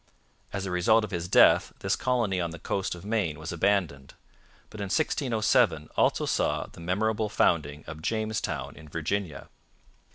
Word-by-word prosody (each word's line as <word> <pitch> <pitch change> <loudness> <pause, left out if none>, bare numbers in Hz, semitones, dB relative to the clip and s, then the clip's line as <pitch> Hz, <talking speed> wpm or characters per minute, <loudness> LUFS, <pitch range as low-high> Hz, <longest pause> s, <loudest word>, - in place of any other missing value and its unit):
As 100 0 -3
a 95 - -4
result 110 +6 +3
of 105 - -5
his 85 -1 -3
death - - +5
this - - +1
colony 115 -8 0
on 85 - -1
the 85 - -8
coast 95 +3 -2
of 90 - -12
Maine 105 -9 -1
was 80 +1 -6
abandoned, 85 -6 0 0.6
but 110 - -10
1607 110 - +1
also - - +2
saw - - 0
the - - -15
memorable 105 +5 0
founding 75 -7 +1
of 80 +1 -8
Jamestown 100 - -2
in 80 - -13
Virginia. 85 0 -3
95 Hz, 155 wpm, -27 LUFS, 80-110 Hz, 0.6 s, death